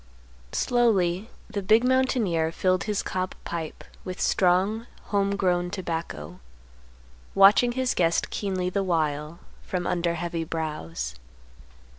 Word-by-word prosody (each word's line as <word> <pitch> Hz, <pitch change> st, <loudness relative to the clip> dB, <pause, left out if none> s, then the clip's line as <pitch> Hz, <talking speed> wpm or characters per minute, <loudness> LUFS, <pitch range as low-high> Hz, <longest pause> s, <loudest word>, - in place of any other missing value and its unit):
Slowly 210 Hz, -5 st, +2 dB, 0.2 s
the 210 Hz, -2 st, -3 dB
big 215 Hz, +5 st, +4 dB
mountaineer 245 Hz, -11 st, +2 dB
filled 185 Hz, +2 st, +1 dB
his 210 Hz, -2 st, -1 dB
cob 185 Hz, 0 st, -3 dB
pipe 165 Hz, -2 st, -5 dB, 0.2 s
with 185 Hz, -1 st, -6 dB
strong, 195 Hz, +5 st, +2 dB, 0.2 s
home 200 Hz, -1 st, +1 dB
grown 180 Hz, -2 st, +1 dB
tobacco, 165 Hz, -, -5 dB, 1.0 s
watching 205 Hz, +5 st, +6 dB
his 260 Hz, 0 st, 0 dB
guest 170 Hz, -1 st, +1 dB
keenly 185 Hz, -3 st, -2 dB
the 200 Hz, -, 0 dB
while, 155 Hz, -3 st, -1 dB, 0.2 s
from 180 Hz, -1 st, -3 dB
under 170 Hz, -1 st, 0 dB
heavy 170 Hz, 0 st, -3 dB
brows. 150 Hz, -, -4 dB
185 Hz, 115 wpm, -26 LUFS, 165-205 Hz, 1.0 s, watching